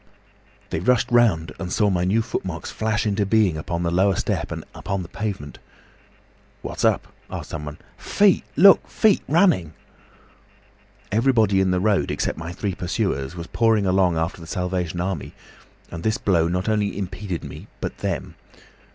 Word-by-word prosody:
"They - - -1
rushed 125 +9 +2
round 110 -10 +3
and 90 -2 -5
saw 105 0 +2
my 90 -1 +1
new 110 +5 +2
footmarks 85 -7 -4
flash 110 0 -1
into 105 0 +1
being 100 -7 +2
on 85 0 -1
the 85 - 0
lower 95 +2 +3
step - - -2
and - - -5
upon 100 -1 -3
the - - -9
pavement. 95 -9 -5 1.0
'What's - - -5
up?' - - +1 0.2
asked - - -7
someone. 75 -2 -6 0.2
'Feet! 200 -3 +3
Look! 195 +2 +7
Feet 215 -2 +3
running!' 155 - +3 1.4
"Everybody 110 -4 +3
in 95 - +2
the 90 0 +1
road, 105 0 +1
except - - -2
my 85 +1 -5
three 95 +2 -3
pursuers, 90 -6 -2
was 85 -1 -6
pouring 110 0 +2
along 90 -3 +2
after 80 +2 -2
the 80 - -10
Salvation 90 -1 -2
Army, 90 -4 -3 0.6
and 85 - -6
this 110 +5 0
blow 85 -7 +2
not 90 +3 -2
only 105 -3 0
impeded 95 -2 -4
me - - -9
but - - -5
them. - - -3
95 Hz, 160 wpm, -23 LUFS, 85-110 Hz, 1.4 s, Look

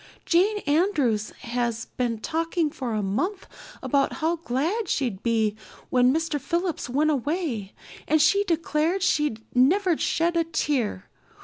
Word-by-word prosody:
Jane 385 +5 +3
Andrews 290 - +1
has 235 -1 -2
been 235 -3 -3
talking 330 +1 -1
for 255 -7 -4
a 210 - -1
month 355 - -2 0.4
about 280 -1 +1
how 330 +1 0
glad 335 - -1
she'd 235 -9 -1
be 220 -3 +1 0.4
when 250 0 +4
Mr. 320 -1 -1
Phillips 345 -3 -2
went 300 +5 +2
away 280 - -2 0.3
and 310 +2 +3
she 320 +7 +4
declared 335 +1 0
she'd 295 -11 +1
never 345 +8 +4
shed 335 +2 0
a 335 - +3
tear. 270 - -1
300 Hz, 135 wpm, -25 LUFS, 240-335 Hz, 0.4 s, when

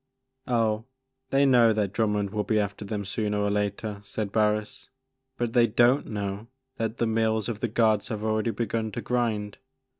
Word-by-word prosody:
" 130 0 -54
Oh, 115 -2 +1 0.4
they 140 +1 +3
know 120 -4 +5
that 105 -2 -1
Drummond 105 -3 0
will 105 0 -1
be 110 +1 +1
after 100 0 -3
them 100 0 -4
sooner 105 +1 -2
or 105 0 +1
later,'* 105 0 -2
said 100 0 -4
Barris, 105 0 0 0.5
"but 120 -1 -2
they 120 -1 +5
don't 120 +5 +3
know 100 0 -4 0.3
that 115 +1 -2
the 115 - +1
mills 110 -1 +1
of 115 -3 -4
the 120 - 0
gods 110 -2 +2
have 110 -1 -4
already 110 +1 0
begun 115 -1 -2
to - - -3
grind. 110 -4 -1
110 Hz, 180 wpm, -26 LUFS, 105-115 Hz, 0.5 s, know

